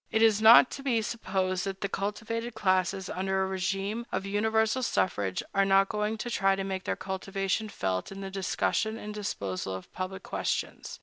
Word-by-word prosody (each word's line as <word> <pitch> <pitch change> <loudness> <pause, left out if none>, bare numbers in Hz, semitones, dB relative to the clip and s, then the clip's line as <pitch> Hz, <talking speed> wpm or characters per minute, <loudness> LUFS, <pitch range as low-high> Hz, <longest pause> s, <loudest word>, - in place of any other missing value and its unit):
It 220 - +3
is 215 -2 +5
not 230 +3 +9
to - - -6
be 240 -5 +1
supposed 190 -4 -1
that 195 -1 -4
the 200 - 0
cultivated 225 +4 -3
classes, 185 -2 +1
under 190 +1 -1
a - - -1
régime 195 +5 -2
of 190 +1 -2
universal 220 +4 +1
suffrage, 100 - 0
are 195 0 +4
not 195 0 +4
going 210 +1 -1
to 240 - -4
try 195 -2 +3
to 195 - -3
make 190 -1 -4
their - - 0
cultivation 195 +2 -2
felt 95 - -2
in 195 0 -7
the 195 0 -5
discussion 200 +3 0
and 210 -1 -7
disposal 95 - -3
of 95 - -10
public 185 +1 -5
questions. - - -3
195 Hz, 185 wpm, -29 LUFS, 190-220 Hz, -, not